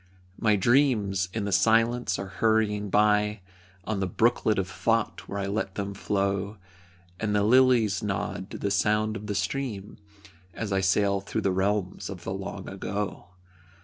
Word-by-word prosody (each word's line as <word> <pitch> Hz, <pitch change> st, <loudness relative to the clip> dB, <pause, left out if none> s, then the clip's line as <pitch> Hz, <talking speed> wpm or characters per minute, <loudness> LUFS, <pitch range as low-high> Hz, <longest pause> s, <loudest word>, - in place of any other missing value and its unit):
My 110 Hz, -2 st, +3 dB
dreams, 105 Hz, -4 st, +2 dB
in 105 Hz, 0 st, -3 dB
the 100 Hz, -, -2 dB
silence 115 Hz, 0 st, +2 dB
are 95 Hz, -, -4 dB, 0.2 s
hurrying 110 Hz, -2 st, +2 dB
by 105 Hz, 0 st, +2 dB, 0.4 s
On 100 Hz, +2 st, -2 dB
the 95 Hz, -, 0 dB
brooklet 110 Hz, +2 st, +2 dB
of 95 Hz, -1 st, 0 dB
Thought -, -, -1 dB
where 100 Hz, -, -5 dB
I 100 Hz, -, -2 dB
let 100 Hz, -1 st, -3 dB
them 100 Hz, 0 st, -3 dB
flow, 100 Hz, +1 st, -1 dB, 0.6 s
And 105 Hz, -1 st, -1 dB
the 105 Hz, -, +3 dB
"lilies 120 Hz, -3 st, +4 dB
nod 95 Hz, -1 st, -3 dB
to -, -, -7 dB
the 100 Hz, -, -2 dB
sound 105 Hz, +2 st, +1 dB
of 105 Hz, 0 st, -7 dB
the 105 Hz, -, -2 dB
stream" 110 Hz, -6 st, -3 dB, 0.6 s
As 110 Hz, -3 st, -4 dB
I 95 Hz, -, +2 dB
sail 100 Hz, +1 st, +2 dB
through -, -, -3 dB
the 95 Hz, -, +1 dB
realms 95 Hz, 0 st, -1 dB
of 95 Hz, -3 st, -8 dB
the -, -, -3 dB
long 95 Hz, 0 st, -6 dB
ago. 100 Hz, 0 st, -4 dB
105 Hz, 165 wpm, -27 LUFS, 95-110 Hz, 0.6 s, lilies